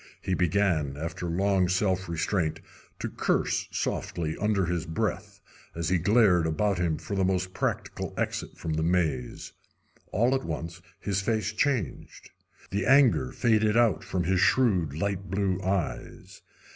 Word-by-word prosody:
He 95 - -2
began, 85 -6 +1
after 85 +3 -4
long 95 +1 +2
self 95 -1 0
restraint, 85 0 -1 0.4
to - - -3
curse - - 0
softly 80 -2 -2
under 105 -2 +1
his 85 -1 -2
breath, 80 - -3 0.4
as 85 -1 -2
he 90 -1 +2
glared 95 -3 +4
about 95 +4 0
him 85 -3 0
for 85 +6 -5
the 95 - +1
most 95 0 0
practical - - -3
exit - - -3
from 80 - -3
the 80 - -1
maze. 80 -7 -1 0.6
All 120 +6 +2
at 135 0 0
once 85 +1 -5 0.2
his 100 -1 -1
face 110 +1 -1
changed. 115 - -2 0.4
The 100 0 -1
anger 135 -3 +5
faded 110 -2 +2
out 115 -5 +3
from 90 -2 -2
his 90 +2 +1
shrewd 90 - +3
light 100 +2 -2
blue 95 -1 0
eyes. 95 -3 -3
95 Hz, 145 wpm, -27 LUFS, 85-100 Hz, 0.6 s, anger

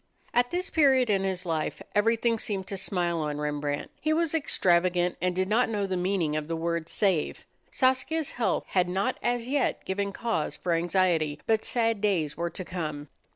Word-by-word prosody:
At 245 0 +3
this 360 +1 -3
period 265 -7 +4
in 195 -1 +2
his 190 -1 -2
life 160 -2 -2
everything 230 +2 +2
seemed 195 -3 -2
to 200 - -3
smile 175 -3 -1
on 150 -1 -2
Rembrandt. 145 -1 -2
He 310 +2 +2
was 330 0 +1
extravagant 180 - +2
and 180 0 0
did 185 0 +1
not 225 +4 +2
know 205 -3 -1
the 190 -1 -2
meaning 180 -4 0
of 155 -1 -2
the 165 - -2
word 170 0 -2
"save." 190 -7 0 0.2
Saskia's 265 +4 +1
health 240 - 0
had 180 -1 +2
not 195 +7 -1
as 240 -1 -1
yet 275 0 0
given 200 +1 -1
cause 225 -8 -2
for 175 - -1
anxiety. 165 -3 +1
But 220 -1 +2
sad 230 -4 +1
days 175 -8 +1
were 170 +1 -2
to 185 +2 -7
come. 155 -5 -5
190 Hz, 185 wpm, -27 LUFS, 170-230 Hz, 0.2 s, period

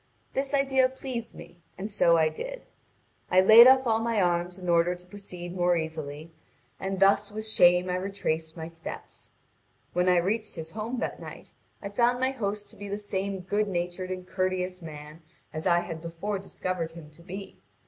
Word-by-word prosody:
This 275 +1 0
idea 265 -2 +3
pleased 260 -3 -6
me, 175 0 -12 0.2
and 205 +3 -5
so 170 -4 +4
I 160 -1 +4
did. - - -6 0.7
I 185 - +5
laid 220 +6 +10
off 260 0 +6
all 225 -2 +2
my 230 -1 0
arms 175 0 +1
in 180 -1 -8
order 170 +1 +3
to 180 0 -16
proceed 180 -2 -9
more 175 -1 +3
easily, 160 -1 -5 0.5
and 190 0 -3
thus 200 +1 +4
with 215 +1 -5
shame 180 -3 +5
I 180 0 0
retraced 170 -4 -3
my 160 - -5
steps. 165 0 -9 0.6
When 180 +1 +2
I 180 - +5
reached 210 +5 0
his 160 -1 -7
home 220 +5 -4
that - - -3
night, - - -10 0.3
I 200 - -4
found 240 +4 +2
my 260 +1 +1
host 210 -5 -4
to - - -17
be 205 - -8
the 200 - -2
same 195 -2 -3
good 205 +3 0
natured 180 0 -3
and 185 -1 -5
courteous 185 0 -2
man 155 0 -10 0.3
as 155 +3 -3
I 175 -1 +4
had 165 -2 -6
before 170 +5 -4
discovered 185 -3 -4
him 160 -3 -11
to 155 - -18
be. 190 +3 -9
185 Hz, 190 wpm, -28 LUFS, 170-210 Hz, 0.7 s, laid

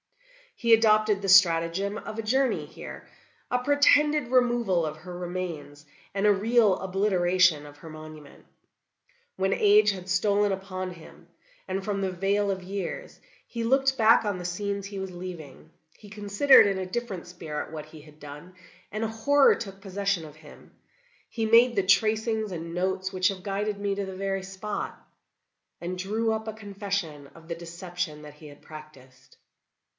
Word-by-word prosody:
"He 235 -1 +3
adopted 215 -2 +4
the 195 - -2
stratagem 185 +2 +4
of 215 - -7
a - - -3
journey 260 +4 +1
here, - - -10 0.4
a 250 - +2
pretended 290 +1 +3
removal 240 -9 +2
of 155 0 -5
her 175 +2 -9
remains, 175 -5 -6 0.3
and 195 +1 -1
a 210 - +6
real 215 0 +3
obliteration 180 -4 +2
of 145 0 -13
her 160 +2 -12
monument. 155 -2 -12 0.9
When 190 +1 +1
age 210 0 +5
had 185 -1 -8
stolen 205 +2 +2
upon 185 -1 -4
him, 165 -3 -14 0.4
and 190 0 -3
from 200 -2 -2
the 190 -1 -1
vale 200 +2 0
of 190 -1 -4
years, 200 - -6 0.3
he 230 -1 -4
looked 270 +3 +2
back 225 0 +5
on 205 -3 -1
the 180 - -7
scenes 200 +2 -3
he 200 -1 -7
was 190 -1 -5
leaving, 175 -6 -9 0.3
he 210 - -15
considered, 210 +6 +5
in 195 -1 -1
a 185 - -3
different 195 -3 -5
spirit, 165 -5 -6
what 155 -1 -7
he 155 -1 -13
had 150 0 -18
done, 150 +5 -11 0.4
and 215 +2 -3
a - - 0
horror 270 +6 +4
took 195 -3 -8
possession 195 -3 -2
of 150 -1 -12
him. 155 -1 -16 0.6
He 225 -1 -2
made 235 +2 +5
the 195 - +2
tracings 220 +2 +1
and 165 -1 -6
notes 190 +1 -2
which 185 0 +2
have 190 -2 -6
guided 205 +1 -2
me 200 -1 -1
to 200 0 -3
the 190 -1 -7
very 195 0 -2
spot, 195 +2 -5 0.8
and 180 +1 -5
drew 220 +4 -1
up 220 0 -4
a 220 - -4
confession 200 -8 -5
of 165 -1 -15
the 170 - -4
deception 170 -2 -6
that 150 -1 -11
he 150 0 -13
had 145 -1 -14
practiced. 135 -4 -14
195 Hz, 170 wpm, -27 LUFS, 175-215 Hz, 0.9 s, a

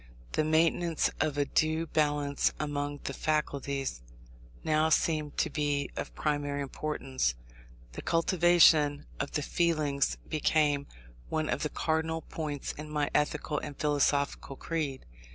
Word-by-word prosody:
The 155 - +1
maintenance 165 +1 +2
of 150 -2 0
a 145 - +2
due 160 +3 +1
balance 145 -2 +1
among 145 -1 -3
the 140 - -3
faculties 140 - -1 0.6
now 155 0 +2
seemed 155 -2 +1
to 165 - +1
be 145 -1 -1
of - - -5
primary 145 -1 -1
importance. 135 - -2 0.6
The - - -7
cultivation 165 -4 +4
of 145 - -3
the 150 - 0
feelings 155 -4 +1
became 150 -2 +1 0.4
one 155 -1 -1
of - - -1
the 150 - -1
cardinal 160 +1 -1
points 150 -3 -4
in 150 +1 -8
my 150 -1 -1
ethical 150 0 0
and 145 - -7
philosophical 145 -1 +1
creed. 150 -4 -3
150 Hz, 130 wpm, -30 LUFS, 145-155 Hz, 0.6 s, cultivation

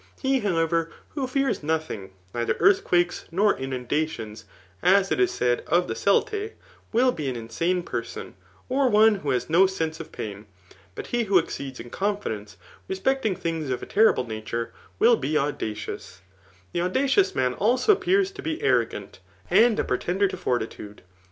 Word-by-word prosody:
He, 265 -1 +1
iiowever, 165 -3 +1 0.2
who 275 -3 -3
fears 270 -1 0
nothing, 150 -11 -3 0.2
neither 120 -1 0
eardiquakes, 280 - +2
nor 200 +5 +3
inundations, 125 -4 -3 0.4
as 195 +1 +4
it - - +1
is 375 -2 +4
said 120 - 0
'Of 175 +2 +2
the - - -2
Celtae, 420 - +1 0.4
will 250 +3 +4
be 150 - -3
an 130 - -3
insane 165 +11 -1
person, 115 -7 -5 0.3
'or 265 0 +2
one 220 +1 +6
who 150 -7 -4
has 125 -2 0
no 175 +4 +5
sense 160 -4 -3
of 165 - -8
pain; 105 0 -7 0.5
but - - -6
he 240 -1 +2
who 195 -2 +4
exceeds 140 -6 -3
in 120 - -9
confidence 190 - -3 0.3
re 190 - -2
specting 220 -2 0
things 165 -4 -3
of 125 - -2
a - - -4
teirible 210 - +3
tiature, 115 +1 -4 0.3
will 235 - +4
he 145 +4 -1
audacioiis^ 110 -10 -3 0.5
The 170 - 0
audacious 270 - +2
man 125 -1 +1
a^ 240 - +1
appears 390 -1 +3
to 395 - -9
be 320 +1 -3
arrogant, 435 - 0 0.3
and 225 -1 +5
a - - +2
pretender 180 +10 0
to - - -5
fortitude. 110 - -4
175 Hz, 165 wpm, -25 LUFS, -, 0.5 s, one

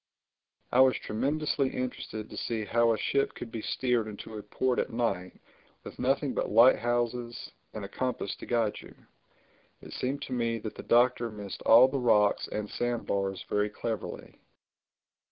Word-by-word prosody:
I 125 - +3
was 130 -1 +6
tremendously 140 +4 -1
interested 115 -4 -5
to - - -11
see 110 -2 -2
how 115 +3 +3
a 110 - +1
ship 140 +6 0
could 115 - -8
be 115 - -4
steered 120 -3 0
into 110 +1 -8
a 105 - -5
port 130 +3 -1
at - - -1
night 115 -6 -2 0.4
with - - -10
nothing 135 +1 +1
but - - -1
light 115 +4 +6
houses 120 0 -2 0.2
and 105 -2 -6
a - - -6
compass 125 -1 -3
to - - -10
guide 115 -3 0
you. - - -14 0.8
It - - -11
seemed 135 +3 -2
to 130 - -5
me 115 -2 0
that 110 -1 -6
the - - -8
Doctor 120 0 +3
missed 105 -2 -8
all 120 +3 +9
the 135 +1 -2
rocks 105 -4 +3
and 105 -1 -4
sand 120 +1 -2
bars 95 -1 -2
very 105 0 +1
cleverly. 110 +1 -6
120 Hz, 170 wpm, -29 LUFS, 105-125 Hz, 0.8 s, all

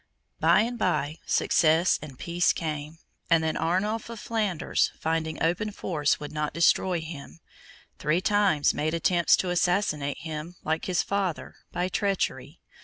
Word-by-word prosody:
By - - +5
and 235 +2 -3
by, 155 -4 0
success 165 +2 +3
and 140 -4 -10
peace 175 +4 +1
came; 155 -1 -5 0.3
and 165 -1 +4
then 160 - 0
Arnulf 210 +7 -1
of 230 -2 -7
Flanders, 210 -8 0
finding 160 -1 -1
open 175 +6 0
force 155 -7 0
would 150 - -7
not 150 -1 -3
destroy 170 +1 +3
him, 160 0 -9 0.6
three 155 +3 +1
times 195 -6 +2
made 155 +2 -1
attempts 170 +1 +3
to 180 - -1
assassinate 175 -5 0
him, 160 +1 -6
like 160 +1 -1
his 180 -3 +1
father, 195 -5 -2 0.2
by 180 +1 -1
treachery. 195 +1 -2
170 Hz, 145 wpm, -27 LUFS, 155-185 Hz, 0.6 s, By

